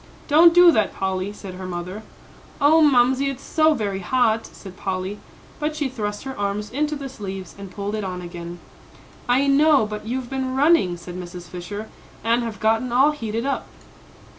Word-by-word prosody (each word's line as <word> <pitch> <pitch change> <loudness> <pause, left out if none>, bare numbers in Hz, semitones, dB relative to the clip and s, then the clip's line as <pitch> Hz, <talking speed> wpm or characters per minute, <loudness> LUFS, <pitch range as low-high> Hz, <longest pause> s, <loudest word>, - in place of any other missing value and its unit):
"Don't 320 +3 +7
do 350 0 +8
that, 215 -9 +1
Polly," 190 +1 -2
said 195 -2 -9
her 185 0 -7
mother. 180 +3 -5 0.6
"Oh, 305 +3 +5
Mamsie, 265 -1 +4
it's 270 -1 -7
so 315 -1 +3
very 200 -5 -2
hot," 225 +3 +1
said 190 -2 -12
Polly; 190 +1 -4 0.4
but 300 0 -2
she 295 -3 -1
thrust 210 -5 -4
her 265 0 -6
arms 205 +1 -2
into 300 +4 -1
the 280 -1 -6
sleeves 195 -7 -7
and 200 -1 -9
pulled 200 +2 -5
it 215 -1 -2
on 185 -1 -4
again. 175 -1 -8 0.7
"I 260 +3 +4
know; 285 -2 +4
but 210 0 -6
you've 250 +1 -3
been 260 0 -3
running," 270 - +3
said 175 +1 -9
Mrs. 175 -1 -8
Fisher, 195 +5 -7 0.4
"and 230 +2 +2
have 225 -3 -5
gotten 225 +3 +1
all 270 +5 +5
heated 230 -4 -4
up." 275 - -2
220 Hz, 180 wpm, -22 LUFS, 190-275 Hz, 0.7 s, do